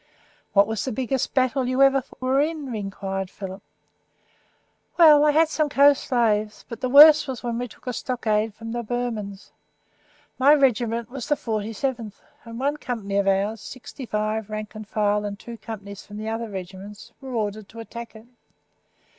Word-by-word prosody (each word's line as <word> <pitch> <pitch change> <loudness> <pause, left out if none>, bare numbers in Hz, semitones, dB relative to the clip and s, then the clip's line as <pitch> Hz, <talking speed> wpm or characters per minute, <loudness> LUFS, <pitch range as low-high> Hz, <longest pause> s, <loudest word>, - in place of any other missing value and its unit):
"What 200 -1 +6
was 220 -1 -3
the 260 - -3
biggest 260 +2 -2
battle 260 0 +1
you 255 +2 +3
ever 270 -1 +4 0.2
were 260 +2 +2
in?" 300 -4 -3
enquired 195 -2 -4
Philip. 190 0 -8 1.4
"Well, 305 -4 +8
I 300 - +5
had 315 +2 +4
some 305 -1 0
close 280 0 +5
shaves, 215 -4 0
but 230 - -8
the 255 - -1
worst 300 +3 +9
was 260 -2 -5
when 235 -1 -2
we 245 - -3
took - - -19
a 250 - -3
stockade 220 -3 -1
from 225 +1 -8
the 240 +1 -2
Burmans. 225 -4 -4 0.9
My 285 +3 +7
regiment 235 -4 +1
was 255 -3 -6
the 295 - +2
47th, 225 0 -3 0.3
and 230 0 -8
one 285 +3 0
company 215 -8 -3
of 200 -1 +1
ours, 200 +3 +1
sixty 255 0 -9
five, 215 0 -2
rank 215 0 -5
and 215 -1 -9
file, 210 -1 0
and 205 -1 -4
two 235 +3 -9
companies 200 -2 -8
from 210 +1 -8
other 225 +1 -3
regiments 195 +2 -9
were 260 -2 -6
ordered 210 -2 -3
to 230 - -11
attack 235 0 -9
it. 220 +1 -13
230 Hz, 170 wpm, -24 LUFS, 210-260 Hz, 1.4 s, worst